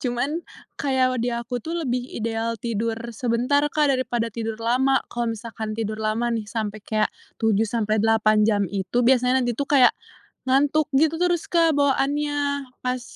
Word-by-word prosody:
Cuman 260 +6 -1 0.4
kayak 260 -2 +2
kalau 255 - -2
di 245 - 0
aku 235 +1 -3
tuh 330 +7 -4
lebih 250 -1 0 0.2
ideal 230 0 -2
tidur 225 0 -2 0.2
sebentar, 245 +4 +1
Kak, 295 -1 +2
daripada 240 -3 -1
tidur 225 0 -4
lama. 255 +4 +1
Kalau 240 -1 -1
misalkan 220 -1 -6
tidur 215 -1 -3
lama 220 +2 0
nih 220 -2 -3
sampai 215 -1 -4
kayak 215 +1 -1 0.2
7 220 -1 +1
sampai 215 -1 0
8 215 -1 +3
jam 205 -2 +2
itu 200 +5 0
biasanya 250 +1 +3
nanti 245 - 0
tuh 275 +5 -4
kayak 265 -4 +6 0.6
ngantuk 285 +3 +3
gitu 320 +3 +2
terus, 350 -2 +1
Kak, 330 -3 +2
bawaannya 285 0 0 0.2
pas, 250 0 -2
240 Hz, 165 wpm, -23 LUFS, 225-275 Hz, 0.6 s, kayak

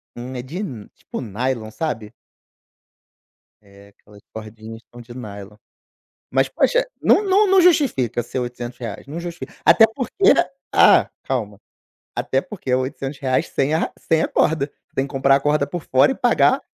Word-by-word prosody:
Hum, 125 +2 -7
é 125 - -4
de 165 +10 -6 0.3
tipo - - -7
nylon, 115 0 -3
sabe? 115 -6 -4 1.5
É, 100 0 -18
aquelas 100 0 -20
cordinhas 110 +1 -9
são 120 0 -11
de 120 +1 -12
nylon. 105 -4 -9 0.8
Mas, - - +2
poxa, - - +2 0.2
não - - +4
não 405 +1 +3
não 385 -1 +6
justifica 255 - +2
ser 120 +3 -5
R$800, 120 -2 -6
não 160 +4 -6
justifica. 175 0 -8
Até 225 - +7
porque 335 - +3 0.4
ah, - - +6
calma, 105 -6 -3 0.6
até 135 - 0
porque 170 -9 -8
é 125 - +4
R$800 135 +2 -2
sem 145 +3 0
a - - +2
ra - - -2
sem 160 0 +1
a - - 0
corda, 150 -2 +1 0.2
tem 135 +1 0
que - - -15
comprar 135 0 +4
a - - 0
corda 145 0 +1
por 175 0 -6
fora 130 - +3
e - - -5
pagar 250 +3 +3
130 Hz, 160 wpm, -21 LUFS, 115-160 Hz, 1.5 s, Até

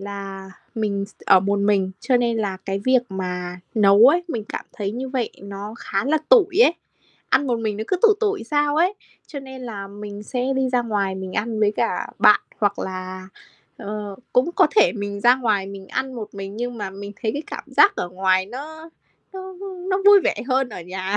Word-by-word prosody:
là 195 -1 -7 0.2
mình 205 -3 -1
s 200 - -21
t - - -46
ở 190 - +7
một 200 +2 0
mình, 200 -2 +2
cho 255 - +2
nên 240 -1 +1
là 200 -4 -1
cái 195 +1 -4
việc 255 -1 +4
mà 180 -2 -4
nấu 205 +1 +6
ấy, 345 +4 +2
mình 230 -9 -3
cảm - - -5
thấy 200 -2 -3
như 260 +3 -4
vậy 255 -4 -2
nó 200 +2 -7
khá 195 - -2
là 310 +4 +2
tủi 395 -6 +5
ấy, 340 - +5 0.6
ăn 270 +2 +3
một 240 -2 0
mình 215 -2 -2
nó 220 - -4
cứ 370 - +2
tủi 430 -2 +7
tủi 415 - 0
sao 290 +3 +1
ấy, 360 +5 +3 0.3
cho 285 - -7
nên 265 -1 -10
là 205 -5 -6
mình 205 0 -8
sẽ 250 +3 -3
đi 265 -1 +1
ra 250 -1 +1
ngoài 205 -4 -1
mình 190 -1 -6
ăn 220 0 -2
với 210 -1 +3
cả - - 0
bạn - - +6 0.2
hoặc 205 -1 +1
là, 185 0 -6 0.5
ờ, 205 -2 -6 0.2
cũng 260 +7 +2
có - - +5
thể - - +6
mình 205 -2 -5
ra 240 +3 +6
ngoài 215 -6 0
mình 195 -1 -9
ăn 260 0 -3
một 220 -4 -7
mình. 195 +1 -7
Nhưng 240 0 -4
mà 200 -2 -4
mình 200 +1 -8
thấy 220 - 0
cái 290 - -4
cảm - - -7
giác 405 - +4
ở 175 - -2
ngoài 185 0 +1
nó 315 +8 -9 0.4
nó 380 0 -7
nó 395 - -6 0.2
nó 380 +1 +1
vui 405 -1 +9
vẻ - - +2
hơn 260 0 +2
ở 195 -6 -8
nhà. 185 +3 -3
215 Hz, 220 wpm, -22 LUFS, 195-265 Hz, 0.6 s, vui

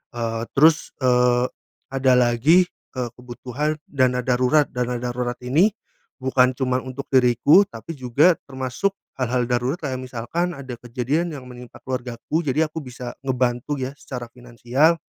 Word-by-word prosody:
Eee, 115 -1 -2
terus, 155 +3 +4
eee, 125 0 +4 0.5
ada 135 -1 +3
lagi, 125 +9 +4 0.3
eee, 125 -2 -2
kebutuhan 125 +4 -3
dana 125 -3 +1
darurat. 130 +4 +3
Dana 125 0 -2
darurat 125 0 -2
ini 160 - +3 0.5
bukan 130 -1 +3
cuman 130 0 0
untuk 135 +2 -6
diriku 130 - +5
tapi 115 +8 -8
juga 140 +6 +3 0.2
termasuk 130 +8 -1 0.3
hal-hal 125 0 +1
darurat 125 +5 0
kayak 130 -6 -3
misalkan 130 +8 -2
ada 135 -3 -7
kejadian 130 +8 -1
yang 130 -2 -9
menimpa 125 -1 -11
keluargaku, 125 +3 -3
jadi 155 +4 +2
aku 160 - -4
bisa 125 -2 -7
ngebantu, 125 +1 0
ya, 130 0 -3
secara 125 -4 -7
finansial. 125 +6 +1
125 Hz, 140 wpm, -23 LUFS, 125-140 Hz, 0.5 s, diriku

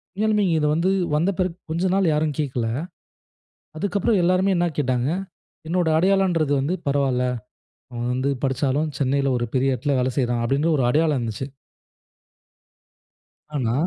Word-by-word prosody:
உண்மையாலுமே 210 0 +2
இங்க 170 -3 +2
இத 150 - +1
வந்து 170 +4 +1 0.3
வந்த 170 +6 +2
பிறகு 180 -2 -1
கொஞ்ச 175 +3 0
நாள் 190 -4 +3
யாரும் 150 -2 0
கேட்கல. 125 -6 -1 1.1
அதுக்கு 200 +2 -1
அப்பறம் 200 -1 +2
எல்லாருமே 185 +2 +3
என்னா 175 0 +2
கேட்டாங்க? 125 -2 0 0.6
என்னோட 175 0 +1
அடையாளன்றது 180 -5 +2
வந்து 155 +7 -1
பரவால்ல. 135 -3 +1 0.7
அவன் 120 0 -3
வந்து 130 +2 0
படிச்சாலும் 135 +3 0
சென்னையில 135 0 +1
ஒரு 120 - -1
பெரிய 135 +1 +2
இடத்தில 140 +3 -1
வேல 125 +1 +1
செய்றான், 120 -2 +1
அப்பிடின்ற 140 +7 +1
ஒரு 130 - +1
அடையாளம் 150 +1 +2
இருந்துச்சு. 115 +3 -4 2.1
ஆனா, 115 -4 0
145 Hz, 145 wpm, -23 LUFS, 130-175 Hz, 2.1 s, நாள்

